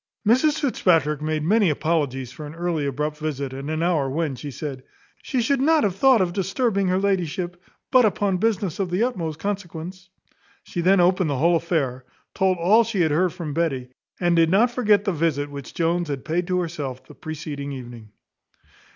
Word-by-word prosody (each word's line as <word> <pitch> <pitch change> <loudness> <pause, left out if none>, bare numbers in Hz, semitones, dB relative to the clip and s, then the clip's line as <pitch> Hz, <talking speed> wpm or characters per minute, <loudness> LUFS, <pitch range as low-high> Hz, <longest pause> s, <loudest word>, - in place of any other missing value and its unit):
Mrs 290 +7 +3
Fitzpatrick 165 - +2
made 155 0 -1
many 205 +3 +3
apologies 145 -5 -1
for 150 +2 -8
an 150 - -10
early, 165 -4 -1
abrupt 150 +3 -2
visit, 140 -3 -3
at 135 +1 -6
an 155 +1 -1
hour 160 -6 +1
when, 155 +1 -1
she 145 +4 -7
said, 140 -1 -6 0.4
"she 255 -3 -1
should 275 +2 +1
not 315 +2 +4
have 195 -4 0
thought 255 +1 +5
of 175 -2 0
disturbing 200 +1 0
her 185 0 +2
ladyship, 180 -2 -1 0.3
but 255 -1 +6
upon 200 -3 +1
business 200 -4 -1
of 190 -2 -1
the 180 +5 +1
utmost 170 -11 -2
consequence." 185 -1 -5 0.5
She 175 - -4
then 190 +2 +4
opened 180 -1 +3
the 140 - -1
whole 170 +5 +3
affair, 145 -7 -1 0.3
told 190 -1 +1
all 200 +7 +5
she 220 -4 -1
had 160 -3 +2
heard 175 +3 +2
from 165 -5 -5
Betty; 140 -6 -1 0.3
and 175 -1 +2
did 165 -1 +4
not 220 +7 +4
forget 215 -4 +2
the 200 - +1
visit 145 -3 -1
which 140 -2 -9
Jones 170 +1 0
had 140 -2 -4
paid 170 +3 -1
to 180 0 +1
herself 145 -7 -5
the - - -14
preceding 150 -2 -6
evening. 120 -4 -9
170 Hz, 190 wpm, -23 LUFS, 150-195 Hz, 0.5 s, but